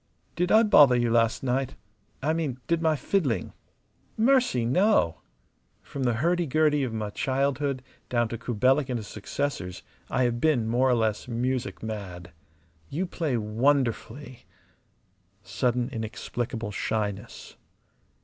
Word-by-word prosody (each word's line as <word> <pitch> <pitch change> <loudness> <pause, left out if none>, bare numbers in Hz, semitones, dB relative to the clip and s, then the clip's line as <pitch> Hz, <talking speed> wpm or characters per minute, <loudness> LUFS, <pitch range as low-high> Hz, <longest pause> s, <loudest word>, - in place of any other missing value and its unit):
"Did 180 +1 0
I 220 +1 +7
bother 145 - +7
you 120 -1 +1
last 115 +1 +2
night? 135 +1 -1 0.5
I 155 +3 +2
mean, 155 -6 -2
did 170 -1 0
my 160 -1 +3
fiddling?" 140 - -1 0.6
"Mercy, 240 - +3
no! 130 - +2 0.6
From 135 -2 -4
the 120 - +2
hurdy 170 +6 +1
gurdy 150 +1 +2
of 130 -3 -1
my 110 -2 -3
childhood, 135 +1 -1 0.3
down 120 -1 +1
to 115 - -4
Kubelik 130 +5 +1
and 125 - -1
his 110 - -6
successors, 105 -4 -4 0.3
I 130 - +1
have 120 -1 0
been 140 -8 +2
more 125 +3 +2
or 125 - +4
less 110 -1 -1
music 125 +1 -2
mad. 95 -5 -6 0.6
You 175 +7 -2
play 160 -8 -2
wonderfully!" 125 +3 -1 1.0
Sudden, 125 0 0
inexplicable 115 0 -4
shyness. 105 -1 -4
125 Hz, 130 wpm, -27 LUFS, 115-145 Hz, 1.0 s, I